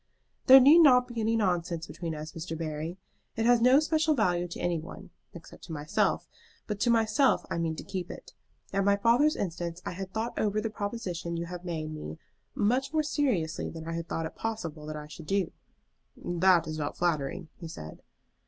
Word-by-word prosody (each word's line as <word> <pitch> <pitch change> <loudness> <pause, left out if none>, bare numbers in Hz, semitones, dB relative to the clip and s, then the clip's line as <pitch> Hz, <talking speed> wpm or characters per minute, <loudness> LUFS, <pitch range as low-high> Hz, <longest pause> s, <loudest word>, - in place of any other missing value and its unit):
"There 265 +1 +11
need 290 +6 +8
not 250 -6 +6
be 240 -2 -4
any 225 +1 +1
nonsense 175 -5 0
between 165 -2 -5
us, 155 +1 -7
Mr. 165 -1 -6
Barry. 160 +2 -4 0.4
It 225 - 0
has 240 -1 +5
no 255 +4 +6
special 310 0 +2
value 180 -7 +1
to 175 - -8
any 175 -2 0
one, 185 +3 -10 0.2
except 170 - -12
to - - -10
myself; 150 0 0 0.4
but 210 -2 -4
to 240 - +2
myself 230 +4 +3
I - - -1
mean 165 -1 -1
to - - -7
keep 185 -3 -5
it. - - -10 0.4
At 195 0 +2
my 200 +1 +4
father's 240 +9 +4
instance 170 -2 -4
I - - -3
had 190 +1 -6
thought 225 +3 -3
over 210 0 +1
the 220 0 -3
proposition 190 -6 -4
you 170 - -3
have 180 +1 -7
made 160 -3 -4
me 80 - -7 0.4
much 255 +6 +1
more 310 0 +1
seriously 250 - -1
than 160 -1 -8
I 165 - -3
had 165 0 -4
thought 165 - -2
it 160 - -6
possible 165 -9 -5
that 155 - -5
I 150 - -7
should 155 +1 -11
do." 195 -3 0 0.7
"That 175 -1 +3
is 155 0 -5
not 145 -1 -3
flattering," 165 0 -1
he 170 - -7
said. 80 - -9
180 Hz, 200 wpm, -29 LUFS, 165-225 Hz, 0.7 s, There